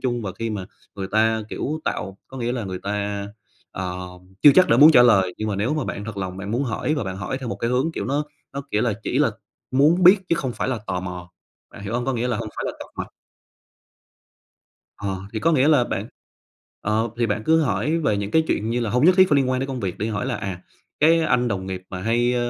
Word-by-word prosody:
chung 120 -2 -1
và 95 -3 -4
khi 115 0 -2
mà 100 -4 -4 0.3
người 95 -1 -4
ta, 110 +1 +2
kiểu, 155 +2 -3
tạo 95 0 -3
có 135 - -10
nghĩa 120 0 -1
là 120 -3 -3
người 95 -1 -5
ta, 100 0 -3 0.4
ờ, 90 -1 -4 0.5
chưa 145 - +10
chắc 185 0 +6
đã - - +5
muốn 150 +5 +9
trả 120 - +8
lời, 95 -7 +4
nhưng 110 - -2
mà 100 - -2
nếu 110 +9 0
mà 150 -4 -1
bạn 100 - -5
thật 110 -2 -7
lòng 95 -2 -4
bạn 95 +1 -6
muốn 120 +5 0
hỏi 130 +5 -1
và 145 - -2
bạn 95 -1 -5
hỏi 100 +7 -4
theo 130 -3 -6
một - - -3
cái 115 - -2
hướng 130 +6 +1
kiểu - - -4
nó 145 +2 -1 0.3
nó 140 - -4
kiểu 105 - +1
là 120 - +1
chỉ 125 - -1
là 145 -5 +3 0.4
muốn 150 +7 +4
biết 185 +4 +9
chứ - - +3
không 130 -6 -2
phải - - -3
là 130 -3 -1
tò 90 -1 -2
mò, 90 -1 -7 0.4
bạn - - -11
hiểu 100 +2 -5
hông? 120 - -1
Có 135 - +1
nghĩa 120 0 -1
là 120 - 0
hông 110 0 -4
phải - - -3
là - - -2
tọc - - -9
mạch. - - -4 1.9
Ờ, 95 -2 -4
thì 110 - -2
có 165 - +2
nghĩa 140 -2 +3
là 145 -6 +5
bạn - - -4 0.7
ờ, 110 +2 0
thì 120 - +2
bạn 105 0 -2
cứ 160 0 +4
hỏi 130 - 0
về 110 -11 +1
những 100 0 -3
cái 160 - +4
chuyện 110 - -1
như 120 +1 0
là 115 -3 -1
hông 125 +7 +2
nhất 180 +1 +6
thiết 185 -1 +6
phải 145 - +4
liên 135 -2 +2
quan 130 0 0
đến 135 - -2
công 130 -2 -4
việc 95 -5 -3
đi, 110 - -2
hỏi 105 -2 -2
là - - -1
"À, 95 -2 -5 0.4
cái 165 +3 +5
anh 125 -6 +2
đồng 95 -4 -2
nghiệp 95 -1 -5
mà 90 -1 -6
hay 120 +4 +1
115 Hz, 265 wpm, -23 LUFS, 100-135 Hz, 1.9 s, chưa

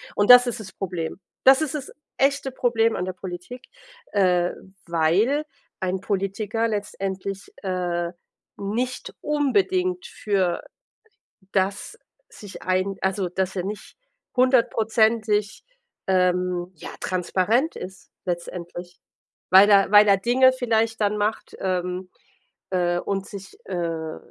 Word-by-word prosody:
Und 205 +3 +5
das 245 0 +9
ist 240 - -3
das 195 -3 -9
Problem. 180 -3 -4 0.2
Das 265 +2 +7
ist 310 -1 -2
das 285 -3 -5 0.3
echte 275 0 +1
Problem 230 -3 +1
an 180 - -2
der 185 - -4
Politik, 185 +7 -8 0.5
äh, 180 -3 +3 0.4
weil 185 - +2 0.4
ein 185 0 -1
Politiker 200 +3 -1
letztendlich, 195 -2 -4
äh, 175 -2 -2 0.5
nicht 235 +6 -3
unbedingt 365 +5 +1
für 190 -4 -1 0.9
das 195 - -1 0.3
sich 205 -2 -11
ein 185 +1 0
also 190 -1 0
dass 190 +1 -2
er 185 - -2
nicht 205 +2 -7 0.4
100%ig, 220 -4 +2 0.5
ähm, 180 -1 +1
ja, 160 - -9
transparent 190 - 0
ist 185 0 -9
letztendlich, 175 0 -6 0.5
weil 190 +2 +9
da 200 -2 +5
weil 210 0 +8
da 200 -1 +6
Dinge 255 +5 +4
vielleicht 225 -3 0
dann 210 0 +1
macht 210 +1 -2
ähm, 180 0 -2 0.6
äh, 175 -1 +1
und 195 +1 -3
sich, 195 -1 -10
äh, 165 -3 -3
195 Hz, 120 wpm, -24 LUFS, 180-230 Hz, 0.9 s, das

